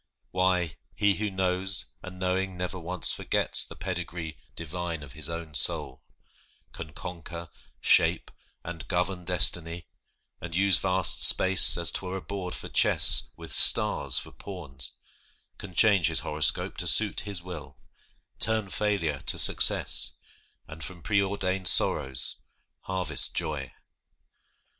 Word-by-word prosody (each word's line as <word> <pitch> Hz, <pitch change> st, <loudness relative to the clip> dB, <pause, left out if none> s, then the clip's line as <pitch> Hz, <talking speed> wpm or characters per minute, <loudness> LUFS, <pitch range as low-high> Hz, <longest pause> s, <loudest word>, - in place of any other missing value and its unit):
Why, 90 Hz, -5 st, -2 dB, 0.2 s
he 100 Hz, -1 st, 0 dB
Who 105 Hz, 0 st, -4 dB
knows, 95 Hz, 0 st, 0 dB
and 90 Hz, 0 st, -12 dB
knowing, 95 Hz, 0 st, -4 dB
never 90 Hz, +1 st, -6 dB
once 90 Hz, +1 st, +1 dB
forgets -, -, 0 dB
The -, -, -13 dB
pedigree 90 Hz, -3 st, -7 dB, 0.2 s
divine 85 Hz, -1 st, -7 dB
of 70 Hz, -, -14 dB
his 75 Hz, 0 st, -2 dB
own 85 Hz, -2 st, -8 dB
soul, 65 Hz, -, +5 dB, 0.7 s
Can 80 Hz, -, -11 dB
conquer, 85 Hz, -1 st, -10 dB, 0.3 s
shape, -, -, +1 dB, 0.3 s
and 80 Hz, -2 st, -10 dB
govern 90 Hz, 0 st, -4 dB
destiny, 85 Hz, -1 st, +3 dB, 0.6 s
And 85 Hz, -1 st, -8 dB
use 95 Hz, -3 st, +4 dB
vast 95 Hz, +2 st, -2 dB
space 95 Hz, -2 st, +7 dB
as 85 Hz, -2 st, +2 dB
'twere 95 Hz, 0 st, -5 dB
a -, -, -9 dB
board 95 Hz, -3 st, -7 dB
for -, -, -10 dB
chess -, -, +3 dB
With -, -, -9 dB
stars 70 Hz, -3 st, +3 dB
for -, -, -4 dB
pawns; 80 Hz, -9 st, -6 dB, 0.7 s
can 95 Hz, -3 st, -12 dB
change 100 Hz, -5 st, +3 dB
his -, -, 0 dB
horoscope 75 Hz, +1 st, -1 dB
To -, -, -1 dB
suit -, -, +4 dB
his 100 Hz, -4 st, -4 dB
will; 80 Hz, -7 st, -11 dB, 0.6 s
turn 110 Hz, -3 st, -1 dB
failure 95 Hz, -9 st, -3 dB
to -, -, +2 dB
success, -, -, +1 dB, 0.5 s
And 80 Hz, +1 st, -12 dB
from 90 Hz, -3 st, -11 dB
preordained 95 Hz, -2 st, -2 dB
sorrows, 65 Hz, -4 st, +1 dB, 0.5 s
harvest 90 Hz, -6 st, -3 dB
joy. 70 Hz, -5 st, -5 dB
90 Hz, 130 wpm, -25 LUFS, 80-95 Hz, 0.7 s, space